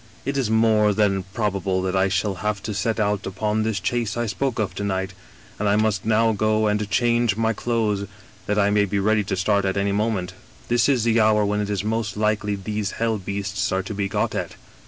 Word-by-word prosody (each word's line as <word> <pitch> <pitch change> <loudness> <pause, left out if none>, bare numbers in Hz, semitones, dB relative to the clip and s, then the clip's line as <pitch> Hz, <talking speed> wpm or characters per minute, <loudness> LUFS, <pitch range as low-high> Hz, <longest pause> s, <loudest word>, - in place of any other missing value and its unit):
* - - -26
It 140 +2 -2
is 135 -5 0
more 110 -2 +3
than 100 -2 +2
probable 100 -3 -1
that 95 0 -1
I 95 0 +3
shall 100 +1 0
have 105 -1 -2
to 110 - -3
set 110 +3 -1
out 105 -2 0
upon 105 +3 -1
this 110 -2 -1
chase 115 +2 -1
I 120 - 0
spoke 125 +3 -2
of 100 -4 -1
to 100 - -5
night, 95 -1 -2 0.5
and 105 0 +1
I 100 - +3
must 105 -2 +1
now 110 +1 +3
go 110 +1 +1
and 105 -1 0
change 120 0 +2
my 115 0 +1
clothes, 105 -4 -1 0.4
that 105 - 0
I 100 0 +3
may 105 0 +3
be 100 +1 -2
ready 105 +2 +2
to 95 - -2
start 100 +2 +1
at 95 0 -1
any 100 0 +1
moment. 100 -3 -1 0.4
This 120 +2 +3
is 130 -5 +2
the 115 0 +3
hour 105 -1 +4
when 105 +1 0
it 105 - -3
is 100 -1 -1
most 110 -1 -2
likely 105 -1 0
these 105 0 -3
hell 115 -2 -1
beasts 100 +1 -3
are 95 0 0
to 100 - -6
be 100 -1 -1
got - - -1
at. - - -4
105 Hz, 230 wpm, -23 LUFS, 100-110 Hz, 0.5 s, hour